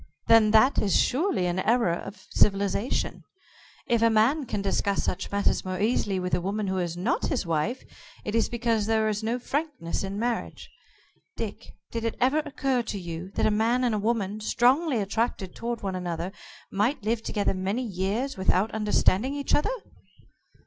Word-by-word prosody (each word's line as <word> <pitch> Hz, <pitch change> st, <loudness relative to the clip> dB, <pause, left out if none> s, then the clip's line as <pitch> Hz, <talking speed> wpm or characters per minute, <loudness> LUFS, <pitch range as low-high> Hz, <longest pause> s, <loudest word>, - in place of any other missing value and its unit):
Then 225 Hz, -2 st, +6 dB
that 220 Hz, +6 st, +5 dB
is 200 Hz, -4 st, +3 dB
surely 285 Hz, -, +1 dB
an 175 Hz, +1 st, 0 dB
error 230 Hz, -3 st, +2 dB
of 195 Hz, +4 st, -7 dB
civilization. 200 Hz, +3 st, +1 dB, 0.6 s
If 235 Hz, -1 st, +1 dB
a 230 Hz, -, +5 dB
man 240 Hz, +6 st, +3 dB
can 205 Hz, -2 st, -2 dB
discuss 200 Hz, 0 st, 0 dB
such 185 Hz, -, -2 dB
matters 200 Hz, 0 st, +1 dB
more 185 Hz, -1 st, -4 dB
easily 205 Hz, -3 st, +1 dB
with 180 Hz, 0 st, -3 dB
a 175 Hz, -, +2 dB
woman 200 Hz, +3 st, -2 dB
who 190 Hz, -1 st, -1 dB
is 175 Hz, -1 st, -2 dB
not 185 Hz, +8 st, 0 dB
his 255 Hz, -, -1 dB
wife, 170 Hz, +10 st, -1 dB, 0.4 s
it 210 Hz, -, -3 dB
is 230 Hz, 0 st, +2 dB
because 230 Hz, -3 st, 0 dB
there 220 Hz, -1 st, +2 dB
is 210 Hz, 0 st, -2 dB
no 225 Hz, +3 st, -1 dB
frankness 275 Hz, -, -3 dB
in 195 Hz, +1 st, -4 dB
marriage. 235 Hz, +1 st, -3 dB, 0.7 s
Dick, -, -, -6 dB, 0.2 s
did 230 Hz, -1 st, -3 dB
it 230 Hz, -, -2 dB
ever 265 Hz, +5 st, +3 dB
occur 275 Hz, -4 st, -1 dB
to 210 Hz, -3 st, -4 dB
you 170 Hz, 0 st, -6 dB
that -, -, +1 dB
a 215 Hz, -, +4 dB
man 230 Hz, +4 st, +2 dB
and 220 Hz, -4 st, +1 dB
woman, 215 Hz, -2 st, -1 dB
strongly 255 Hz, +6 st, +2 dB
attracted 200 Hz, -2 st, -1 dB
toward 235 Hz, -1 st, -4 dB
one 195 Hz, -1 st, -2 dB
another, 175 Hz, 0 st, -3 dB, 0.4 s
might 210 Hz, +6 st, 0 dB
live 220 Hz, +1 st, 0 dB
together 205 Hz, -3 st, -1 dB
many 195 Hz, +6 st, -2 dB
years 215 Hz, +6 st, -2 dB
without 190 Hz, +2 st, +2 dB
understanding 220 Hz, +3 st, +2 dB
each 285 Hz, -1 st, -2 dB
other?" 295 Hz, -, +3 dB
215 Hz, 175 wpm, -27 LUFS, 195-240 Hz, 0.7 s, Then